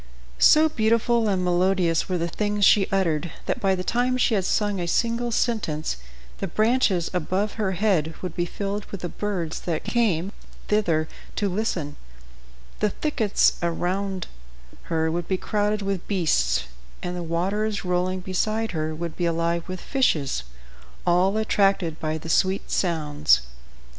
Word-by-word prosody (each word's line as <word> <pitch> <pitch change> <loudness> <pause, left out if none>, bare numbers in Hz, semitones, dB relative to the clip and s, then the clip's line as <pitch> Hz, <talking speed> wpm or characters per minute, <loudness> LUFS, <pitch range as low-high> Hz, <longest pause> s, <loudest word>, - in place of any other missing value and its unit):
So 310 +1 +7
beautiful 230 -3 +2
and 190 -3 +1
melodious 180 -1 +2
were 180 - 0
the 170 0 -1
things 205 +3 0
she 195 -1 +5
uttered 175 -4 0
that, - - -1
by 195 -2 +3
the 185 - -4
time 245 +5 +1
she 245 - +2
had 195 -4 +1
sung 205 -1 0
a 175 - -2
single 235 +6 0
sentence, 185 - -1 0.4
the 195 - -2
branches 215 -3 +2
above 185 +4 -1
her 205 -4 -1
head 180 -5 +1
would 180 -3 -4
be 175 -1 -1
filled 200 +2 -4
with 200 - -8
the 175 - -3
birds 180 -6 -3
that 165 -3 -3
came 200 -6 +1 0.4
thither 170 -7 +2 0.3
to 205 - 0
listen, 180 -7 -2 0.8
the 210 - +2
thickets 225 -4 +1
around 185 +2 -1 0.6
her 160 -1 0
would 170 +1 -2
be 190 - 0
crowded 210 +1 -1
with 195 -2 -3
beasts, 60 - +1 0.4
and 180 0 -3
the 175 - -4
waters 195 +6 -1
rolling 180 +1 0
beside 215 +5 -1
her 155 -2 -2
would 170 0 -5
be 175 - 0
alive 170 +1 0
with 185 0 -4
fishes, 155 - +1 0.6
all 185 +4 +3
attracted 195 -6 +1
by 155 0 -2
the 160 - -9
sweet 190 +3 +1
sounds. 150 - +2
185 Hz, 155 wpm, -24 LUFS, 170-210 Hz, 0.8 s, So